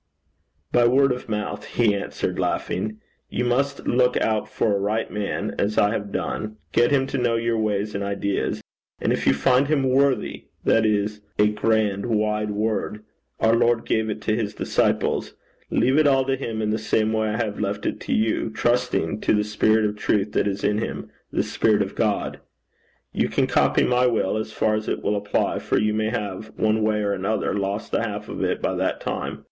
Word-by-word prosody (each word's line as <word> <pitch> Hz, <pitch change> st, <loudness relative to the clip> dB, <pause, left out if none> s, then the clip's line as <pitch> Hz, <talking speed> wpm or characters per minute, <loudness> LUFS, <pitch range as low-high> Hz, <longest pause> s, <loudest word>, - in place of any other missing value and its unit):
'By 120 Hz, -1 st, +4 dB
word 135 Hz, +2 st, +4 dB
of 125 Hz, -1 st, -4 dB
mouth,' 105 Hz, -1 st, -3 dB
he 115 Hz, -4 st, +4 dB
answered, 100 Hz, -, -3 dB
laughing. 105 Hz, +3 st, -2 dB, 0.3 s
'You 125 Hz, -, -1 dB
must 140 Hz, +3 st, 0 dB
look 125 Hz, 0 st, +3 dB
out 110 Hz, -1 st, 0 dB
for 105 Hz, -3 st, +1 dB
a -, -, 0 dB
right 105 Hz, +3 st, -1 dB
man, 105 Hz, -1 st, -3 dB
as 105 Hz, +2 st, 0 dB
I 105 Hz, -, +4 dB
have 100 Hz, -2 st, -3 dB
done, 110 Hz, 0 st, -3 dB
get 120 Hz, 0 st, +4 dB
him 135 Hz, -2 st, +2 dB
to 135 Hz, 0 st, -3 dB
know 120 Hz, -1 st, +1 dB
your 115 Hz, 0 st, 0 dB
ways 105 Hz, -1 st, -1 dB
and 100 Hz, -, -2 dB
ideas, 100 Hz, 0 st, -2 dB, 0.4 s
and -, -, +1 dB
if -, -, -2 dB
you 70 Hz, -, +5 dB
find 125 Hz, -, +3 dB
him 150 Hz, -2 st, +2 dB
worthy 130 Hz, +1 st, +1 dB, 0.2 s
that 110 Hz, -1 st, +4 dB
is 105 Hz, 0 st, 0 dB, 0.2 s
a 105 Hz, 0 st, +4 dB
grand 105 Hz, -1 st, 0 dB
wide 105 Hz, -1 st, 0 dB
word 105 Hz, 0 st, -2 dB, 0.4 s
our 110 Hz, -, +4 dB
Lord 115 Hz, 0 st, +2 dB
gave 110 Hz, 0 st, 0 dB
it 105 Hz, 0 st, -4 dB
to 110 Hz, +1 st, 0 dB
his 110 Hz, -2 st, -2 dB
disciples -, -, 0 dB, 0.3 s
leave 135 Hz, +4 st, +3 dB
it 155 Hz, -, +5 dB
all 135 Hz, -1 st, +3 dB
to 135 Hz, 0 st, +1 dB
him 115 Hz, -5 st, -4 dB
in 105 Hz, -, 0 dB
the 110 Hz, -, 0 dB
same 110 Hz, 0 st, +1 dB
way 110 Hz, 0 st, +1 dB
I 105 Hz, -, -1 dB
have 110 Hz, -3 st, -2 dB
left 105 Hz, 0 st, -2 dB
it -, -, -2 dB
to -, -, -6 dB
you, 110 Hz, +1 st, +1 dB
trusting 120 Hz, -5 st, 0 dB
to -, -, +2 dB
the 105 Hz, -, +2 dB
spirit 110 Hz, +1 st, +2 dB
of 105 Hz, 0 st, -1 dB
truth 105 Hz, 0 st, 0 dB
that -, -, +1 dB
is 100 Hz, 0 st, -3 dB
in 105 Hz, -, +2 dB
him, -, -, -5 dB, 0.2 s
the -, -, +1 dB
spirit 105 Hz, -2 st, +2 dB
of 95 Hz, -, -7 dB
God. 105 Hz, -3 st, -1 dB, 0.7 s
You -, -, +1 dB
can -, -, +2 dB
copy -, -, +3 dB
my 125 Hz, 0 st, +3 dB
will 110 Hz, -5 st, +1 dB
as 110 Hz, 0 st, -3 dB
far 110 Hz, 0 st, +1 dB
as 110 Hz, 0 st, -2 dB
it -, -, -2 dB
will 105 Hz, -, +1 dB
apply, 105 Hz, 0 st, 0 dB
for -, -, 0 dB
you 105 Hz, 0 st, +2 dB
may 110 Hz, 0 st, 0 dB
have, 105 Hz, -2 st, -4 dB
one 110 Hz, 0 st, +2 dB
way 105 Hz, 0 st, +1 dB
or 100 Hz, 0 st, 0 dB
another, 100 Hz, +3 st, -1 dB
lost 100 Hz, 0 st, -2 dB
the -, -, +1 dB
half -, -, -4 dB
of -, -, -3 dB
it -, -, -1 dB
by -, -, +1 dB
that -, -, -1 dB
time. -, -, -4 dB
110 Hz, 205 wpm, -23 LUFS, 105-120 Hz, 0.7 s, you